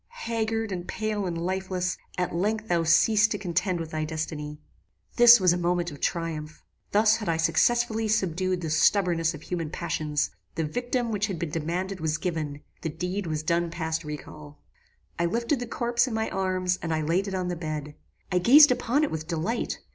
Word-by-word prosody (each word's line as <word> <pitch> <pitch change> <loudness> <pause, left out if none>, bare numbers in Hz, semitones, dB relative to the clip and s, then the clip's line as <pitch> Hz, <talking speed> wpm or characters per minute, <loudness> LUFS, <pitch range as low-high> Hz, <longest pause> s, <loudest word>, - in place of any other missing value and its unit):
Haggard, 225 -1 -1
and 180 -1 -4
pale, 215 -3 -2
and 170 -1 -3
lifeless, 185 +1 -2 0.2
at 180 -1 -1
length 210 +5 -1
thou 170 -1 +2
ceasedst 210 +7 +4
to 205 - -2
contend 180 -1 -1
with 165 -1 -5
thy 155 0 -2
destiny. 155 -1 -4 0.6
"This 240 -1 +9
was 180 -2 +4
a 175 - -1
moment 175 0 0
of 145 - -11
triumph. 165 -2 -3 0.3
Thus 215 +1 +4
had 215 -5 -4
I 165 - +1
successfully 225 +7 +2
subdued 185 -3 0
the 160 -2 -3
stubbornness 165 0 +2
of 155 - -11
human 170 -3 -3
passions: 150 -3 -2 0.2
the 165 - -1
victim 245 - -2
which 210 0 0
had 190 -4 -4
been 165 -2 -4
demanded 180 +5 -3
was 155 -1 -1
given: 155 -5 -3 0.2
the 160 - -2
deed 180 +4 -3
was 155 -1 -2
done 170 +1 +1
past 160 -1 -3
recal. 85 - -9 0.6
"I 170 - +2
lifted 235 - 0
the 245 - -4
corpse 240 +2 +1
in 235 - -3
my 220 0 -1
arms 185 -1 0
and 165 - -3 0.2
laid 185 +5 +1
it 195 - -3
on 180 -1 -2
the 175 - -2
bed. 155 -3 -5 0.4
I 180 - +3
gazed 280 - +8
upon 250 +4 +1
it 300 - 0
with 155 0 -4
delight. 175 +8 -2
180 Hz, 190 wpm, -26 LUFS, 160-215 Hz, 0.6 s, This